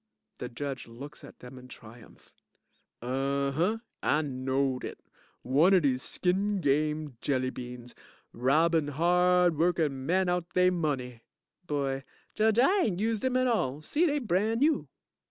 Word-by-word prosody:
The 125 - -5
JUDGE 135 +1 -5
looks 140 +6 -10
at - - -14
them 125 +1 -10
in 125 - -13
triumph.) 115 -1 -15 0.7
Unh 140 +2 -1
hunh! 185 +10 0 0.2
I 150 +1 +2
knowed 130 -1 -1
it, - - -6 0.4
one 155 +10 +4
of 180 - +3
dese 130 -2 +1
skin 195 +6 0
game 150 -2 0
jelly 130 -2 0
beans. 125 -1 -9 0.4
Robbin' 155 +5 +2
hard 175 +2 +3
workin' 155 -6 0
men 185 +2 +2
out 175 -1 -2
they 180 0 +4
money. 135 -9 -2 0.5
BOY 135 -3 -2 0.3
Judge, 220 0 +2
I 370 +11 +4
ain't 185 -5 -1
used 220 0 -1
'em 255 -1 +1
at 255 - +2
all. 155 - 0
See, 325 - +1
dey's 295 -1 0
brand 220 +2 0
new. 305 +1 +2
150 Hz, 150 wpm, -29 LUFS, 130-185 Hz, 0.7 s, one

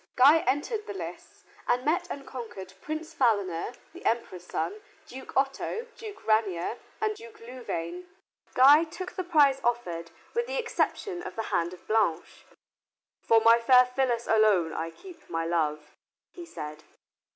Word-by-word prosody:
Guy 285 +6 +7
entered 420 - -1
the 410 - -5
lists - - -8 0.2
and 250 +1 +1
met 350 +4 +1
and 280 -4 -6
conquered 210 -8 -8
Prince 315 +1 -5
Philaner, 205 - +1 0.2
the 350 - -12
Emperor's 185 -6 -2
son, 420 +2 -3 0.2
Duke 265 +1 -8
Otto, 275 - 0
Duke 425 -3 -10
Ranier, 215 -2 +1 0.2
and 430 0 0
Duke 445 0 -13
Louvain. 255 - -6 0.5
Guy 285 +5 +8
took 365 +3 -7
the 370 - -4
prize 290 -6 +4
offered 175 -9 -1 0.2
with 475 +1 0
the - - -3
exception 415 -5 -1
of - - -7
the 225 - -2
hand 170 0 +1
of 180 - -13
Blanche. 215 -7 0 0.8
"For 225 0 +4
my 230 +1 +6
fair 250 +2 +6
Phyllis 250 -2 0
alone 210 -7 +3
I 165 +1 -3
keep 345 - -14
my 165 0 -2
love," 155 -3 -1 0.4
he 345 -1 -9
said. 150 - -8
250 Hz, 150 wpm, -28 LUFS, -, 0.8 s, Guy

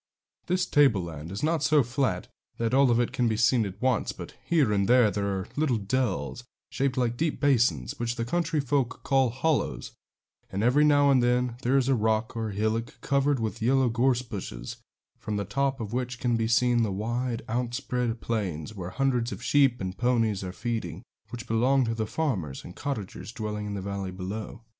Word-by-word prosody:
This 180 0 +1
tableland 90 - +1
is 100 - -5
not 160 0 +1
so 150 -1 +4
flat 130 +3 -1 0.3
that 115 +1 -1
all 135 0 +5
of 120 0 +3
it 120 - +1
can 125 - +1
be 110 -1 0
seen 120 -1 +3
at 95 - -9
once, 125 -3 +1
but - - -9
here 145 -11 +2
and 100 -1 +1
there 120 -3 +5
are 100 -2 -2
little 145 -5 +1
dells, 105 - -2 0.3
shaped 135 -1 -1
like 120 -2 +1
deep 160 +1 -1
basins, 120 - +2
which 120 0 -1
the 115 - -2
country 165 +3 0
folk 135 -2 -1
call 135 -2 +3
hollows; 145 +5 -1 0.6
and 100 +3 -2
every 130 +6 +4
now 145 -1 +5
and 130 -2 +4
then 125 0 +1
there 130 +2 +2
is 130 -2 +2
a 135 - +4
rock 110 -1 0
or 110 -1 -2
hillock 110 +3 -2
covered 140 -1 +1
with 110 0 -3
yellow 130 +2 +3
gorse 125 +1 +2
bushes, 90 - -7 0.4
from 105 - -4
the 100 - -2
top 135 +6 -1
of 110 -1 -5
which 125 0 -3
can 120 -2 +1
be 115 -1 0
seen 120 +1 +3
the 110 -3 0
wide, 115 +4 -2
outspread 120 0 -2
plains, 100 -6 -3
where 90 -4 -6
hundreds 125 0 0
of - - -7
sheep 135 -4 +3
and 95 0 -5
ponies 115 -5 +1
are 90 - -4
feeding, 115 +3 -4 0.3
which 120 -1 -7
belong 125 +4 +3
to 115 - -1
the 110 -1 -2
farmers 100 - -2
and 90 - -10
cottagers 110 -7 -5
dwelling 105 -2 -4
in 100 - -4
the 100 - -4
valley 100 -1 -4
below. 100 +5 -6
120 Hz, 195 wpm, -27 LUFS, 105-130 Hz, 0.6 s, all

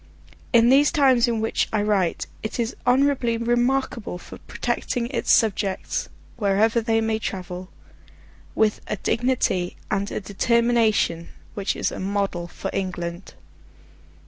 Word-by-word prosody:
In 235 -1 +5
these 275 +2 +5
times 265 -6 +4
in 230 -2 0
which 220 - 0
I 215 -2 +1
write, 200 -5 +1 0.2
it 220 - -5
is 230 -1 -1
honourably 250 -2 +3
remarkable 240 -3 0
for - - -12
protecting 245 -2 -2
its 250 -4 0
subjects, 200 -3 +1 0.3
wherever 215 +2 +2
they 225 0 +1
may 220 0 0
travel, 180 -2 -5 0.9
with 215 -1 +2
a - - -1
dignity 225 -5 0
and 200 0 0
a - - -3
determination 215 -3 +1 0.3
which 200 -2 -2
is - - -1
a - - -6
model 195 -3 -2
for 195 +2 -6
England. 175 -1 -4
220 Hz, 130 wpm, -23 LUFS, 195-240 Hz, 0.9 s, In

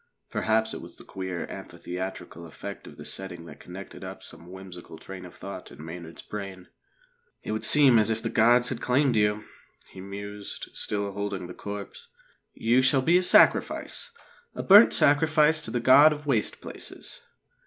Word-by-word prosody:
Perhaps 110 0 0
it - - -6
was - - -12
the - - -14
queer 95 -2 -5
amphitheatrical 90 -2 -7
effect 80 - -9
of - - -13
this - - -5
setting 90 -3 -7
that 75 -3 -12
connected 95 +2 -10
up - - -8
some 85 - -11
whimsical 95 -3 -11
train 95 +2 -10
of 90 - -13
thought 95 -2 -9
in 75 - -11
Maynard's 85 0 -9
brain. 95 -3 -8 0.7
"It - - -5
would 110 - -3
seem 135 -6 +6
as 110 - +2
if 110 0 -2
the - - -2
gods 120 +2 +4
had 120 -3 -5
claimed 130 0 +2
you," 105 0 +1 0.5
he 95 - -10
mused, 100 +1 -8
still 100 -1 -3
holding 100 -2 -4
the 90 - -9
corpse. 100 0 -8 0.5
"You 120 +3 +3
shall 130 0 +3
be 170 +5 +4
a - - 0
sacrifice 180 - +3 0.5
a - - -4
burnt 205 +4 +8
sacrifice 155 +1 +4
to - - -6
the 120 - -1
God 140 +6 +7
of 150 0 -10
Waste 120 -7 -1
Places." - - -7
105 Hz, 175 wpm, -26 LUFS, 95-130 Hz, 0.7 s, burnt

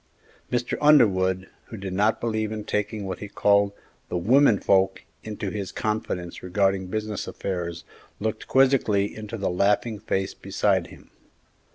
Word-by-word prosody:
Mr. 120 0 -1
Underwood, 95 -11 +4 0.2
who 110 - -9
did 95 -1 -5
not 105 +4 +2
believe 110 -2 -1
in 110 -1 -4
taking 105 0 -2
what 95 -2 -4
he 105 - -6
called 100 0 +3 0.4
the - - -1
"women 115 +4 +4
folks" 95 0 +2 0.2
into 105 -2 -5
his 100 -3 -4
confidence 105 -5 -3
regarding 95 0 0
business 105 +1 -3
affairs, 85 -3 -4 0.4
looked 110 +1 -3
quizzically 130 -7 +3
into 110 +1 -6
the 100 -3 -1
laughing 105 +4 +1
face 95 -2 -2
beside - - 0
him. - - -16
105 Hz, 145 wpm, -25 LUFS, 95-110 Hz, 0.4 s, Underwood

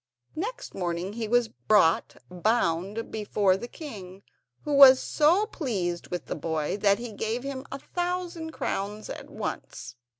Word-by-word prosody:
Next 440 +10 -5
morning 175 +1 -3
he 225 0 -3
was 240 +1 +3
brought 165 - +2
bound 195 +1 0
before 205 -3 +1
the 215 +5 -6
king, 200 - -9 0.4
who 295 - -2
was 270 -2 +9
so 335 +7 +3
pleased 195 - -3
with 180 - -4
the - - -3
boy 160 -1 -2
that 200 -1 +3
he 240 -1 -6
gave 225 +4 -2
him 275 -1 -5
a 275 - -4
thousand 350 +1 -3
crowns 210 -5 -3
at - - -8
once. 130 -2 -6
220 Hz, 145 wpm, -27 LUFS, 185-275 Hz, 0.4 s, was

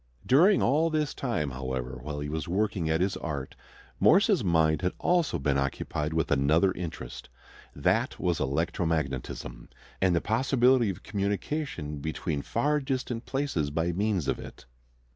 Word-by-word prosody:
During 175 +10 +5
all 155 +6 +3
this 155 -3 0
time, 95 - -2
however, 65 -1 -4
while 75 +1 -5
he 75 - -3
was 80 0 -3
working 95 -2 0
at 80 +2 +1
his 95 +1 +1
art, 70 -4 -5 0.5
Morse's 195 - +5
mind 80 -3 +2
had 90 -1 0
also 175 -3 +1
been 70 0 +1
occupied 75 +3 -2
with 80 -1 -1
another 75 +7 +3
interest. 90 -3 -7 0.5
That - - +1
was 90 -3 0
electromagnetism, 70 -6 -2 0.3
and 95 -2 +3
the - - +3
possibility 125 0 +3
of 95 - -6
communication 100 - -3
between 80 0 -3
far 145 - 0
distant 130 -3 -3
places 135 - -1
by 80 +4 0
means 95 -3 0
of - - 0
it. - - -11
85 Hz, 145 wpm, -28 LUFS, 75-125 Hz, 0.5 s, During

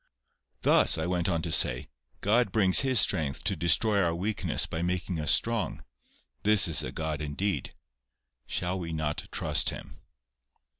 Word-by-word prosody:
"Thus," - - +3
I 80 - -3
went 90 -1 -1
on 85 -3 -2
to 85 - -4
say, 60 -4 +1 0.4
"God 110 +1 +1
brings 95 -4 +5
His 130 -3 +4
strength 80 -9 0
to 95 - -1
destroy 95 +6 +2
our 85 -2 0
weakness 100 +4 -1
by 80 - -5
making 90 0 -3
us 75 -1 +2
strong. 115 -3 0 0.6
This 105 -3 +5
is 80 -5 +2
a - - -5
God 80 -1 -4
indeed! 85 +7 -3 0.8
Shall 90 +2 -2
we 85 -2 -6
not 75 -2 -4
trust - - +1
Him?" - - -9
90 Hz, 155 wpm, -27 LUFS, 80-100 Hz, 0.8 s, brings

